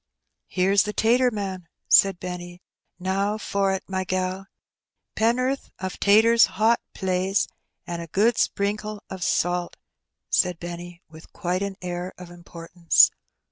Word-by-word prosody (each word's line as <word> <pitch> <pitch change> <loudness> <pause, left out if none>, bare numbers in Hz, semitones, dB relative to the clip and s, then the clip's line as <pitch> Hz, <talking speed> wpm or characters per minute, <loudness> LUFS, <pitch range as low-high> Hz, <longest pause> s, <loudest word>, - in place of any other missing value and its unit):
"Heroes 195 +2 +3
the 210 0 -2
tater 245 +4 +3
man/* 190 -5 -5 0.2
said 195 -3 +5
Benny; 180 0 -7 0.4
^'now 195 +3 -1
for't, 195 -2 -1
my 190 0 -2
gal. 185 +1 -3 0.7
Pennorth 255 +4 0
o' 185 - -3
taters 220 +5 +5
— - - -13
hot, 225 +2 +3
plaise, 190 +1 0 0.4
an' 170 -1 -5
a 170 - -7
good 215 +8 +2
sprinkle 210 +1 -1
o' 190 - -4
salt,'* 175 -1 -1 0.5
said 180 -2 +1
Benny, 175 0 -8
with 160 0 -15
quite 180 +1 -2
an 200 -1 -4
air 180 +1 -5
of 180 -1 -11
importance. 170 0 +2
190 Hz, 135 wpm, -24 LUFS, 175-205 Hz, 0.7 s, said